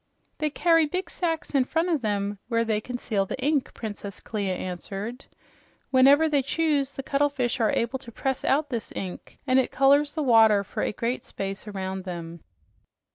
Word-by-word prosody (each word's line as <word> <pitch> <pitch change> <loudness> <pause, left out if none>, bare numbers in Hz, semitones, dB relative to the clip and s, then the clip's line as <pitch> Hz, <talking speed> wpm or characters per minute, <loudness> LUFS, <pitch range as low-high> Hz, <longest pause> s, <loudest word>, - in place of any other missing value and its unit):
"They 305 -1 +1
carry 330 +1 +3
big 365 +3 -3
sacks 330 -3 -2
in 275 -2 +4
front 325 +7 0
of 320 -6 +1
them 205 -2 -1
where 230 -1 +1
they 215 -1 0
conceal 220 -5 -2
the - - -4
ink," 285 0 +1
Princess 205 -3 -6
Clia 200 -4 -2
answered. 195 +8 -6 0.7
"Whenever 275 +4 +6
they 290 -3 +2
choose, 285 -1 0
the 270 - -5
cuttlefish 275 -3 0
are 225 - +3
able 235 +3 -1
to 235 -3 -11
press 265 +3 -2
out 290 +2 +2
this 230 -3 -3
ink, 185 -2 -7
and 255 +1 +4
it 260 - +1
colors 285 +2 +4
the 310 - -1
water 220 -5 +5
for 200 - -5
a - - 0
great 235 +4 -2
space 195 +2 -6
around 190 -2 -4
them." 170 -2 -7
250 Hz, 180 wpm, -26 LUFS, 205-285 Hz, 0.7 s, Whenever